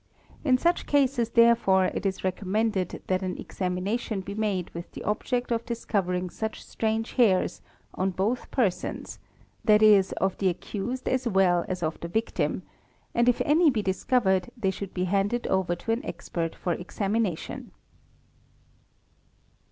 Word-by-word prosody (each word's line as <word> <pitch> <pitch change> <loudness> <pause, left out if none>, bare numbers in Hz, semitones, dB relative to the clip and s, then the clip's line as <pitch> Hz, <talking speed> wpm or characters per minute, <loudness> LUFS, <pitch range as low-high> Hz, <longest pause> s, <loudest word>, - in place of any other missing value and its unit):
In 260 -4 +4
such 345 +6 +1
cases 265 -5 +2
therefore 230 -6 +4
it - - -1
is 190 - -3
recommended 190 +1 -1
that 185 0 0
an 185 -1 -3
examination 195 +3 -2
be 195 +2 -6
made 200 -4 -1
with 170 +1 -8
the - - -7
object 245 +4 -1
of 230 0 0
discovering 185 -6 -2
such 220 0 -5
strange 220 0 -1
hairs 205 -8 +2 0.3
on 190 +1 0
both 200 +7 -1
persons 215 -9 -2 0.4
(that 215 0 +5
is 200 -3 +6
of 190 0 0
the 190 - +3
accused 220 +8 -4
as 255 -1 0
well 185 -4 +3
as 185 -1 -3
of 160 0 -2
the 170 - -5
victim), 220 +6 -1 0.5
and 235 +1 +4
if 245 - +2
any 315 +2 +5
be 225 -6 0
discovered 190 -1 +1
they 195 -5 +1
should 190 0 -7
be 180 - 0
handed 200 +6 0
over 190 -2 +1
to 225 - -4
an 230 +5 0
expert 165 - -4
for 175 - -1
examination. 195 +1 -2
200 Hz, 150 wpm, -27 LUFS, 185-235 Hz, 0.5 s, is